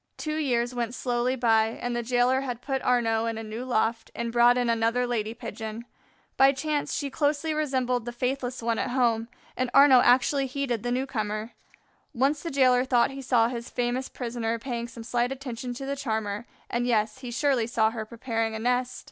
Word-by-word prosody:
Two 310 0 -3
years 245 -5 0
went 240 0 -3
slowly 245 0 0
by, 225 -2 +2
and 245 0 -2
the 240 - 0
jailer 245 +2 +2
had 250 -3 -4
put 270 -2 -2
Arnaux 230 -2 +1
in 225 -1 -2
a 225 - -5
new 220 +3 -6
loft 230 -2 0
and 235 0 -3
brought 240 +1 +5
in 245 -1 +1
another 230 +2 +1
lady 225 -2 -2
Pigeon. 225 0 -7 0.5
By 270 +1 +6
chance 295 +2 -2
she 285 -2 -3
closely 300 +2 0
resembled 260 -5 0
the 240 - -4
faithless 250 0 -3
one 230 -1 0
at - - -1
home. 235 -3 +1 0.3
Arnaux 255 +1 +6
actually 265 +3 +3
heeded 260 -4 -2
the 245 - -2
newcomer. 225 -4 -2 0.6
Once 275 +4 +1
the 335 - -4
jailer 255 -3 +4
thought 255 -1 +2
he 270 0 -7
saw 245 -3 +3
his 235 -1 -6
famous 245 +1 -2
prisoner 230 -2 -3
paying 235 -1 -4
some 235 -1 -10
slight 240 +2 0
attention 255 -2 -5
to 270 - -6
the 280 +1 -2
charmer, 220 -4 -3 0.2
and, 240 +1 -1
yes, 220 0 +1
he 255 -2 -7
surely 245 -2 +1
saw 220 -2 +2
her 225 -1 -4
preparing 225 0 -3
a - - -4
nest. 250 +2 0
245 Hz, 190 wpm, -27 LUFS, 230-260 Hz, 0.6 s, By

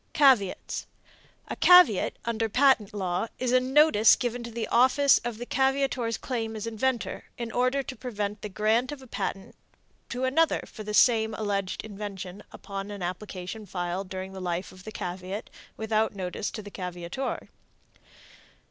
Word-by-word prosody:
CAVEATS. 260 -10 +3 0.6
A - - -4
caveat, 360 - +6
under 225 -1 0
the - - -17
patent 260 -5 +4
law, 185 0 -2
is 250 -1 -1
a 255 - +6
notice 260 -4 +5
given 245 -1 -3
to 235 - -6
the 230 -1 -3
office 260 +3 +5
of 240 -2 -5
the 245 - -6
caveator's 265 -3 +1
claim 225 -3 -3
as 215 - -4
inventor, 230 +2 -2
in 235 -1 -4
order 255 +4 +1
to 260 - -7
prevent 210 -4 -4
the 210 - -5
grant 220 +6 +1
of 280 -2 -8
a - - -12
patent 195 -4 -4 0.6
to 250 +2 -3
another 290 +5 +2
for 220 - -11
the 210 0 -3
same 220 -3 +4
alleged 200 -3 -2
invention 200 -2 -7
upon 195 0 -6
an 200 -3 -6
application 185 +3 -5
filed 180 +1 -3
during 190 0 -6
the 190 - -7
life 175 0 -3
of 185 0 -15
the 215 - -6
caveat 185 +3 -5 0.3
without 220 -1 0
notice 185 +1 -3
to 215 - -7
the 205 - -10
caveator. 180 +7 -5
220 Hz, 165 wpm, -27 LUFS, 195-250 Hz, 0.6 s, caveat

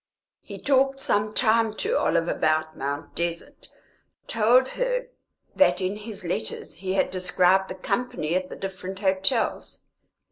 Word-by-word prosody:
He - - -10
talked 270 0 +2
some 210 -4 +1
time 225 -2 +3
to 445 - -1
Olive 170 - +1
about 155 -1 0
Mount 140 +3 -4
Desert, 170 0 -4 0.6
told 240 +4 +3
her - - -2 0.5
that 180 -11 +4
in 190 +1 -1
his 210 -2 -8
letters 165 -10 -3
he 185 +2 -4
had 195 - +1
described 185 +1 +2
the - - -5
company 185 -5 -2
at 185 0 -1
the - - -7
different 190 0 -6
hotels. 195 +4 0
190 Hz, 140 wpm, -25 LUFS, 180-230 Hz, 0.6 s, that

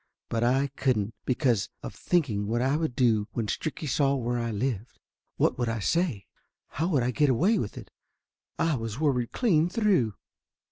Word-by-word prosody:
But 115 0 0
I 135 +3 +2
couldn't, 115 -6 0
because 125 -5 +1
of - - -6
thinking 120 - 0
what 110 - -2
would 120 - +1
I 150 +5 +1
do 115 -4 +2
when 115 - -1
Stricky 155 +7 -3
saw 140 +1 +2
where 120 -2 -1
I 115 0 -2
lived? 115 0 -3 0.4
What - - +1
would 120 -2 0
I 115 - -1
say? 145 - 0 0.4
How 160 +5 -1
would 145 -9 +2
I 125 - +1
get 145 +3 +2
away 185 - +3
with 105 - -4
it? - - -10 0.7
I 165 -1 +1
was 115 +1 -5
worried 130 -6 +1
clean 175 -9 +2
through. 180 - +2
125 Hz, 180 wpm, -27 LUFS, 115-155 Hz, 0.7 s, away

